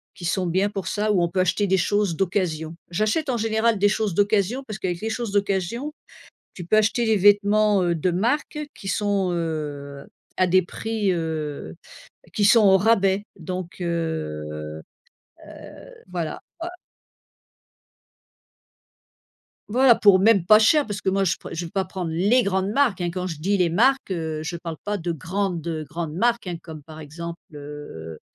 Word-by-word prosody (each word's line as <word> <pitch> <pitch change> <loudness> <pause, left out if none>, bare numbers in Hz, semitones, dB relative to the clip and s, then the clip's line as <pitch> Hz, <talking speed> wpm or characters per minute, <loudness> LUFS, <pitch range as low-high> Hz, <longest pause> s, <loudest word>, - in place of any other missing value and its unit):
qui 175 - -8
sont 180 +2 0
bien 190 +4 +1
pour 195 -2 -5
ça, 210 0 0
où 185 -4 +3
on 170 - 0
peut 185 - -2
acheter 185 +3 +1
des 190 - +3
choses 205 -2 +1
d'occasion. 170 -4 -1 0.2
J'achète 215 - 0
en 240 - +1
général 220 -1 +1
des 205 - +4
choses 210 -2 -1
d'occasion 205 +6 +1
parce 215 - -5
qu'avec 175 -2 -3
les 220 - -2
choses 230 -2 -3
d'occasion, 205 - -1 0.6
tu 180 - -7
peux 215 - +3
acheter 220 +2 +2
les 220 - +3
vêtements, 205 0 +4
heu, 170 -1 +1
de 170 +3 0
marque 245 - -1 0.2
qui 195 - -8
sont, 200 -2 0
heu, 145 -4 -4 0.3
à 185 - +4
des 185 +1 +4
prix, 210 +1 -2
heu, 155 - -4 0.6
qui 205 - +2
sont 225 +2 +6
au 190 -1 +7
rabais 195 -1 +2 0.2
donc, 180 +1 -6
heu 75 - -4 0.7
heu, - - -12 0.2
voilà, 165 -4 -3 0.2
quoi. 345 +1 -5 3.0
Voilà, 250 +1 +5
pour 200 -3 +5
même 200 -4 +4
pas 215 +2 +7
cher. 290 +7 +4
Parce 205 -1 -5
que 190 - +1
moi, 195 +1 +1
je 170 -3 +1
pre - - -10
je 170 +1 -4
vais 165 - -9
pas 190 -1 -1
prendre 180 -4 -5
les 205 +9 +3
grandes 190 0 0
marques, 245 -8 +2
hein. 175 - 0
Quand 185 0 -3
je 165 -4 -5
dis 195 +5 +1
les 175 -2 +2
marques, 250 +5 +2
heu, 160 -3 -3
je 170 +2 -4
parle 165 -1 -6
pas 205 0 -2
de 170 -1 -3
grandes, 175 +1 -3
heu, 160 -2 -3
grandes 155 +1 -5
marques, 235 +1 +1
hein, 175 -2 -3
comme, 160 -3 -10
par 155 +1 -11
exemple, 170 +3 -7
heu 145 - -9
185 Hz, 180 wpm, -23 LUFS, 165-210 Hz, 3.0 s, au